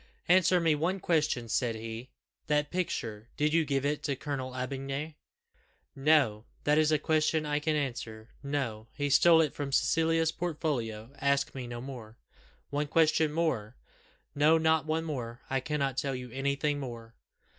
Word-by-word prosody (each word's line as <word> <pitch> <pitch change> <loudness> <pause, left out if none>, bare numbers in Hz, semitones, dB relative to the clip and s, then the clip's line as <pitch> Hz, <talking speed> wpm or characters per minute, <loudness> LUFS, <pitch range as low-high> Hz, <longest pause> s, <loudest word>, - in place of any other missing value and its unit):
"Answer 180 0 +5
me 165 -2 +3
one 170 +6 0
question," 150 -9 +1
said 115 +1 0
he: 115 +3 -7 0.4
"that 150 -1 +1
picture 115 -11 -3
did 150 +1 +1
you 165 0 +4
give 140 -2 -1
it 145 +1 0
to 140 -2 -1
Colonel 135 -1 -4
D'Aubigny?" 135 +4 -4 0.8
"No. 135 -7 +3 0.2
That 150 +1 +3
is 155 0 +3
a 155 - +4
question 155 +1 +1
I 150 0 0
can 155 +1 0
answer. 120 -6 -4
No 135 -6 -3
he 145 -1 -1
stole 165 +3 +7
it 155 -3 0
from 145 -1 -4
Cecilia's 160 +4 +2
portfolio. 135 -9 -3
Ask 140 0 +1
me 130 -2 -6
no 120 0 -6
more." 120 -4 -9 0.5
"One 145 +1 -1
question 155 0 +3
more 130 -9 -1 0.3
" - - -35
"No, 150 +3 +5
not 160 -1 +2
one 160 +1 0
more 125 -6 -5
I 135 - +2
cannot 140 -1 -2
tell 135 -1 -1
you 125 -1 -7
anything 140 +2 -1
more." 115 -4 -7
145 Hz, 165 wpm, -30 LUFS, 125-155 Hz, 0.8 s, stole